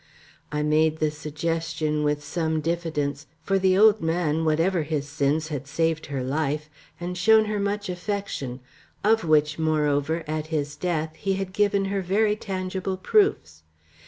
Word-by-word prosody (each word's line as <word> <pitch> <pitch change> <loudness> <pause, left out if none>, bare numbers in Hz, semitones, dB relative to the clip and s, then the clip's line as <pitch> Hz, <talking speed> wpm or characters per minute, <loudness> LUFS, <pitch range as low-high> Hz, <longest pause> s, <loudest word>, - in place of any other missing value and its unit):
I 150 0 -1
made 155 +1 +2
the 155 -1 +1
suggestion 155 0 -2
with 150 0 0
some 160 0 -1
diffidence, 150 -3 -2 0.2
for 195 0 +1
the 185 0 +3
old 215 +1 +6
man, 160 -1 0
whatever 165 +3 +2
his 150 -2 -2
sins, 150 +2 0
had 145 -3 -5
saved 160 +1 0
her 135 -3 -3
life, 150 +2 -2 0.3
and 175 +1 -4
shown 220 +4 +5
her 210 -1 -2
much 205 +1 -1
affection, 180 - -4 0.4
of 220 +2 +3
which, 150 -1 +2
moreover, 155 0 +1
at 155 0 -3
his 145 -2 -2
death 160 -3 -2
he 195 -1 -1
had 190 -1 -3
given 200 -1 +2
her 195 - 0
very 210 +3 +2
tangible 190 -2 -3
proofs. 180 - +1
160 Hz, 155 wpm, -25 LUFS, 150-190 Hz, 0.4 s, old